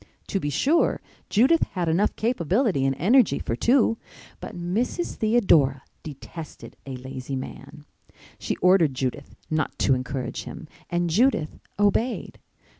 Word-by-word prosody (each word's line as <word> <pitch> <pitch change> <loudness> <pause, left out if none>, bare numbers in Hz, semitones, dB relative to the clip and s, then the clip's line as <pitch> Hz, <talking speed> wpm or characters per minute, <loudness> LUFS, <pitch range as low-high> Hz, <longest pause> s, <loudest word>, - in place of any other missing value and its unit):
To 195 - 0
be 145 - -2
sure, 285 - +2 0.3
Judith 265 +10 +4
had 180 -3 -1
enough 175 +6 +1
capability 200 - +1
and 135 - 0
energy 210 - +4
for 115 - -3
two; 230 - +2 0.4
but - - -8
Mrs. 210 - -2
Theodora 170 - +3 0.2
detested 155 +2 -10
a 135 - -5
lazy 130 +1 -6
man. 135 +3 -8 0.5
She - - -2
ordered 180 -7 +4
Judith 130 -1 -4 0.2
not 155 -1 -1
to 135 - +3
encourage 130 0 -4
him - - -9 0.2
and 175 0 0
Judith 220 - +1 0.2
obeyed. 205 +4 0
175 Hz, 130 wpm, -25 LUFS, 135-225 Hz, 0.5 s, Judith